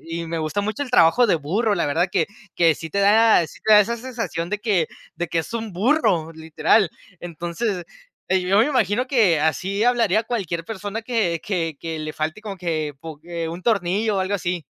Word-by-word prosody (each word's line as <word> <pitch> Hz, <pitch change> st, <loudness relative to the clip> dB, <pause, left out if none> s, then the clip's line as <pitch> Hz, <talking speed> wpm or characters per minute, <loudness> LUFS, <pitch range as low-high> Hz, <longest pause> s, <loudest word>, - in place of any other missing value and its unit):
Y 165 Hz, 0 st, -4 dB
me 165 Hz, 0 st, -3 dB
gusta 160 Hz, +6 st, -2 dB
mucho 215 Hz, +7 st, -3 dB
el 260 Hz, -, -6 dB
trabajo 240 Hz, +3 st, +5 dB
de 195 Hz, -, +3 dB
burro, 200 Hz, +9 st, 0 dB
la 175 Hz, -, 0 dB
verdad 175 Hz, +6 st, +1 dB
que 175 Hz, -5 st, +1 dB, 0.3 s
que 165 Hz, -2 st, +4 dB
sí 160 Hz, -, -8 dB
te 200 Hz, -, -1 dB
da 210 Hz, -3 st, +5 dB
sí -, -, -15 dB
te 215 Hz, -1 st, +5 dB
da 210 Hz, -, +9 dB
esa 235 Hz, +3 st, -1 dB
sensación 230 Hz, -9 st, -4 dB
de 210 Hz, +1 st, -2 dB
que 205 Hz, -7 st, +1 dB, 0.3 s
de 175 Hz, -1 st, -3 dB
que 165 Hz, -, 0 dB
es 160 Hz, -, -9 dB
un 225 Hz, -2 st, -4 dB
burro, 185 Hz, -, +1 dB
literal. 160 Hz, +5 st, +2 dB, 0.3 s
Entonces, 175 Hz, +3 st, -4 dB, 0.5 s
eh, 190 Hz, 0 st, +3 dB
yo 195 Hz, +3 st, +2 dB
me 225 Hz, -, +5 dB
imagino 250 Hz, -3 st, +1 dB
que 210 Hz, -, +3 dB
así 190 Hz, +7 st, 0 dB
hablaría 230 Hz, -4 st, +3 dB
cualquier 190 Hz, -8 st, -3 dB
persona 210 Hz, 0 st, -5 dB
que 215 Hz, -9 st, -1 dB
que 165 Hz, -7 st, -2 dB
que 165 Hz, -1 st, -5 dB
le 155 Hz, 0 st, -5 dB
falte 155 Hz, +7 st, -4 dB
como 200 Hz, -3 st, -7 dB
que, 155 Hz, -4 st, -2 dB
bu 160 Hz, -1 st, -9 dB
que 170 Hz, -1 st, -5 dB
un 170 Hz, +2 st, -7 dB
tornillo, 205 Hz, 0 st, +1 dB
o -, -, +1 dB
algo 190 Hz, +2 st, -1 dB
así. 175 Hz, -3 st, -2 dB
190 Hz, 210 wpm, -22 LUFS, 165-220 Hz, 0.5 s, da